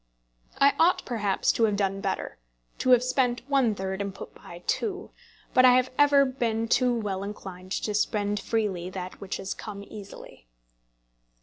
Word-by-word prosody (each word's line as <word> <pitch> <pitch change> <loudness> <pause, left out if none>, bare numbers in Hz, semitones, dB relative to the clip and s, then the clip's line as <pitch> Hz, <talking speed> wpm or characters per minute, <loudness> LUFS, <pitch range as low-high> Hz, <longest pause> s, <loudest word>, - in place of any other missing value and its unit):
I 280 0 +5
ought 345 +3 +3
perhaps 210 -5 +1
to 230 - +2
have 210 -2 +1
done 195 -1 -1
better, - - -3 0.4
to - - 0
have 250 -1 +6
spent 255 -1 0
one 265 -6 +2
third, 190 0 -3
and 200 -1 -4
put - - -9
by 175 +1 -12
two; 400 -2 -2 0.4
but 255 - +6
I 250 -1 +8
have 255 0 +2
ever 285 -1 +5
been 230 -4 -1
too 245 0 +2
well 195 -3 -3
inclined 190 -2 -8
to 210 - -2
spend 205 0 0
freely 195 -5 -2
that 185 -1 -7
which 195 -1 -4
has 195 0 -4
come 200 -2 -8
easily. 200 - -12
215 Hz, 170 wpm, -27 LUFS, 195-255 Hz, 0.4 s, I